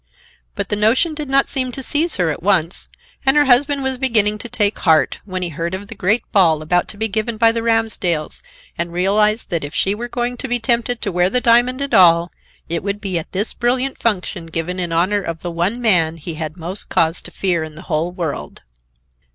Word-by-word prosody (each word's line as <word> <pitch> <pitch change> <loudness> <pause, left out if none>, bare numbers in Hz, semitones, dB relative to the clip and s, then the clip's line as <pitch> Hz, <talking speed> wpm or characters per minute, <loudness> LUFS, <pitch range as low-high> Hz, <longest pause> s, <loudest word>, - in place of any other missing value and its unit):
But - - -3
the - - +1
notion 230 +10 +2
did 300 -2 -6
not 275 0 +3
seem 255 -2 -1
to 270 - -4
seize 315 +5 +2
her 175 -4 +1
at - - -6
once, 180 -2 +1 0.3
and 270 +2 +3
her 295 - +5
husband 275 +2 +3
was 265 -1 -2
beginning 215 -5 +3
to 240 - -7
take 215 -3 +1
heart, 160 -3 +2
when 185 -2 -4
he 175 - -1
heard 170 +3 -3
of 200 +2 -9
the - - -6
great 210 +3 +1
ball 165 -6 +3
about 175 +3 +1
to 205 - -7
be 220 +1 +1
given 220 +2 -3
by 225 0 +4
the 230 0 -2
Ramsdells 225 -8 -1 0.4
and 170 0 -2
realized 210 +5 +1
that 170 -3 -1
if 145 +2 -7
she 195 - +1
were 235 +3 -5
going 245 0 -3
to 265 - -4
be 245 -1 +1
tempted 235 +1 0
to 200 - -1
wear 180 +1 +2
the 250 - +2
diamond 245 +2 +3
at 280 - -4
all, 170 -1 +5 0.4
it 170 0 -2
would 200 +1 -3
be 190 -4 -2
at 160 - -10
this 200 +4 +1
brilliant 255 +2 -1
function 185 -5 -2
given 165 +3 -3
in 175 -2 -3
honor 185 +5 +1
of 165 -3 -6
the 175 - -4
one 175 +8 -1
man 175 -9 +3
he 165 +1 -6
had 155 +1 -6
most 180 +4 -4
cause 165 +1 +1
to - - -11
fear 175 -4 0
in 155 -1 -9
the 170 - -11
whole 165 +1 -2
world. 170 - -5
200 Hz, 225 wpm, -18 LUFS, 170-240 Hz, 0.4 s, her